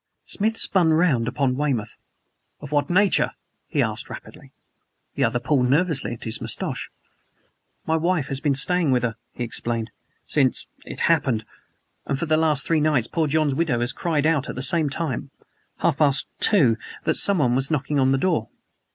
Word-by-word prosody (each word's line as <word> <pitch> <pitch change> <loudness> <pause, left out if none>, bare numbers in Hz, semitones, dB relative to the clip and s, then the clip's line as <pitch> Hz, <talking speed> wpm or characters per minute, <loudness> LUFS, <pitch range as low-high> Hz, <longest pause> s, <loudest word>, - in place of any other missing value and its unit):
Smith 220 +2 -1
spun 175 -4 +3
round 155 -8 +2
upon 135 -1 0
Weymouth. 130 -7 -2 0.6
"Of 145 -1 -10
what 145 -1 0
nature?" 190 +2 +3 0.3
he - - +1
asked - - -3
rapidly. - - -11 0.6
The 140 - -1
other 120 0 +1
pulled 125 0 +1
nervously 150 -2 +1
at 115 - -10
his 110 0 -2
mustache. - - -2 1.0
"My 160 0 +1
wife 170 -2 0
has 135 -1 0
been 145 -2 0
staying 170 +3 +2
with 125 -2 +2
her," 115 -2 -1 0.2
he 120 - -5
explained, 115 0 -2 0.3
"since 135 -5 0 0.2
it - - -8
happened; 135 -9 +1 0.6
and 140 - -1
for 155 - -2
the 155 -1 +2
last 155 -3 +1
three 160 -2 +1
nights 150 -6 +2
poor 160 +4 -1
John's 150 -1 +1
widow 135 -5 0
has 120 +1 0
cried 155 -4 -1
out 155 -4 +1
at - - -5
the 130 - -3
same 155 +1 +4
time 140 -3 -3 0.5
half 150 - +1
past 145 -2 +2
two 140 - +4 0.3
that - - +1
someone 150 -12 +2
was 135 +2 +1
knocking 145 -1 -1
on 130 0 +3
the 135 - +2
door." 155 -7 0
145 Hz, 175 wpm, -23 LUFS, 125-160 Hz, 1.0 s, same